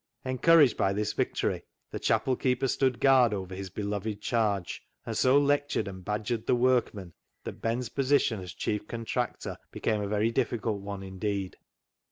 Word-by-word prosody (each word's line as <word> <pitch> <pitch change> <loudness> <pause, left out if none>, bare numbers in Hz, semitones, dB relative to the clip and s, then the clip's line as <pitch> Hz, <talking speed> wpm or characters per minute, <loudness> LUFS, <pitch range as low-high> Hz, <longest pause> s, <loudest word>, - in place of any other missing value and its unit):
Encouraged 135 +1 +5
by 95 0 +2
this 105 +1 -1
victory, - - -1 0.3
the - - -4
chapel 115 +4 +1
keeper 130 +1 0
stood 130 -1 +1
guard 130 -5 +5
over 95 -1 -6
his 95 0 -6
beloved 105 +2 -3
charge, 105 -5 -1 0.2
and - - -4
so 130 +2 +4
lectured 145 -3 +1
and 95 -1 -8
badgered 105 +3 -2
the - - +4
workmen 120 -8 +1 0.3
that - - -7
Ben's 115 +2 -1
position 135 -5 +2
as 90 -1 -7
chief 105 0 -2
contractor 115 +1 -3
became 110 -2 -1
a 100 - -2
very 105 +2 +1
difficult 115 -4 -1
one 100 -1 -6
indeed. 95 0 -3
110 Hz, 160 wpm, -28 LUFS, 100-125 Hz, 0.3 s, Encouraged